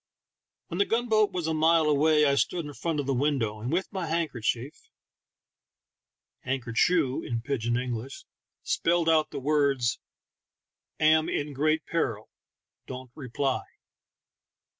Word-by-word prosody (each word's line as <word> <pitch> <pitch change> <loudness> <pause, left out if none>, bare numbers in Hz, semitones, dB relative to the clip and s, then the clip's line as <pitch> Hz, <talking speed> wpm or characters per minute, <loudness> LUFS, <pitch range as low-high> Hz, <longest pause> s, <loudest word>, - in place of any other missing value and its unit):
When 170 - -4
the 200 - +4
gun 240 +2 0
boat 215 -1 +3
was 180 -3 -3
a 160 - 0
mile 160 +1 +4
away 150 +1 +4
I 140 - +3
stood 165 +4 0
in 145 - -7
front 160 +1 -2
of 145 - -2
the 135 - 0
window, 125 -6 0
and 120 +4 -3
with 180 +4 0
my 185 -3 -3
handkerchief 145 -5 -2 1.5
{han 135 +1 -1
ker 120 -1 -7
choo 145 0 +2
in 115 -1 -4
pidj 130 -4 -2
in 120 0 +2
English) 125 +1 -5 0.4
spelled 170 0 +1
out 160 -1 +3
the 145 - -5
words, 140 -4 +1 1.0
"Am 155 +1 +4
in 145 0 -2
great 155 +3 +1
peril; 115 -10 -2 0.6
don't 130 -1 -8
reply." 135 -1 -2
145 Hz, 145 wpm, -27 LUFS, 130-160 Hz, 1.5 s, the